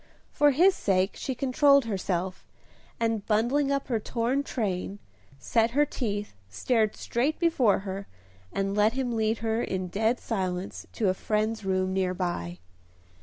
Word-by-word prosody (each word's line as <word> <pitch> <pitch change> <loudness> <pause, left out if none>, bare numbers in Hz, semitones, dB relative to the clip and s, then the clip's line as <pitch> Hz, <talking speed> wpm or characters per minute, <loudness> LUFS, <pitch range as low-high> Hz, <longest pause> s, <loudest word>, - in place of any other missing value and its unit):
For 295 -1 +4
his 350 +8 +5
sake 190 - +1
she 265 - -4
controlled 280 +1 +4
herself, 185 -3 -3 0.5
and, 225 -2 0
bundling 245 +7 +2
up 275 0 -1
her 235 -4 0
torn 235 +5 -1
train, 200 -7 -3 0.4
set 225 - +1
her 295 - +5
teeth, 205 -6 -3 0.2
stared 215 - +1
straight 270 +7 -1
before 265 - +3
her, 195 0 -6 0.4
and 195 0 -1
let 210 +2 +3
him 250 -2 -2
lead 220 0 +1
her 225 +1 +1
in 185 -4 -3
dead 220 +6 +1
silence 185 -4 -3
to 215 -5 +1
a - - +2
friend's 215 +3 -1
room 185 -1 0
near 185 -1 0
by. 130 - -3
220 Hz, 150 wpm, -27 LUFS, 190-250 Hz, 0.5 s, his